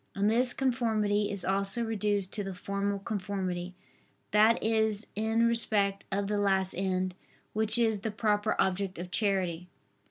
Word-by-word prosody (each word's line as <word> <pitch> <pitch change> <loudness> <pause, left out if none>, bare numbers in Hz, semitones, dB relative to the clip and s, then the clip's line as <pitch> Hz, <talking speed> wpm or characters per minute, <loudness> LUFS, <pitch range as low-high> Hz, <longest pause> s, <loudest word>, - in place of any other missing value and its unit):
And 205 +2 +2
this 245 +2 +3
conformity 220 -5 +1
is 200 -2 -5
also 195 +4 +1
reduced 205 -3 -1
to 205 - -3
the 195 -1 -5
formal 200 +2 -2
conformity, 185 -3 -4 0.6
that 215 +2 +5
is 220 -1 +1
in 220 +2 +1
respect 205 -4 +2
of 200 +1 0
the 205 +1 -1
last 190 -2 +1
end, 185 0 -1 0.4
which 220 +1 +2
is 225 -3 +2
the 220 +3 -3
proper 210 0 0
object 190 0 0
of 180 +1 -7
charity. 185 -5 0
205 Hz, 150 wpm, -29 LUFS, 195-220 Hz, 0.6 s, that